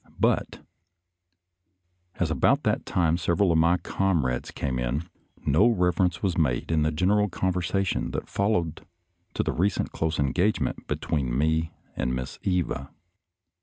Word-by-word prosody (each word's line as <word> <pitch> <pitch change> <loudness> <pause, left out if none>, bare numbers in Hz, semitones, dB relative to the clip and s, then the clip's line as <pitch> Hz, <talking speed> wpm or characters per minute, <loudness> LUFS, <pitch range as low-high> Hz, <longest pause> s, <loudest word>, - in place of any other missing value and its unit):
But - - 0 1.5
as - - -1
about - - +3
that - - 0
time 85 -2 +2
several 85 +2 +2
of 80 - +3
my 85 +2 +4
comrades 85 -8 0
came 65 -3 -3
in, 65 +7 -2 0.4
no 80 +11 +4
reference 90 -4 +1
was 90 -3 0
made 65 -2 0
in 80 -1 +2
the 75 +1 +2
general 100 +6 +2
con 95 +1 -1
versation 90 +2 -1
that - - -3
followed 90 -6 -1 0.5
to - - +1
the - - -1
recent 95 +2 0
close 80 -1 -2
en 70 -2 +1
gagement 100 +4 0
between 65 -6 -1
me 80 +2 +1 0.2
and 65 - -1
Miss 65 0 -5
Eva. 90 -7 -1
85 Hz, 145 wpm, -26 LUFS, 75-95 Hz, 1.5 s, my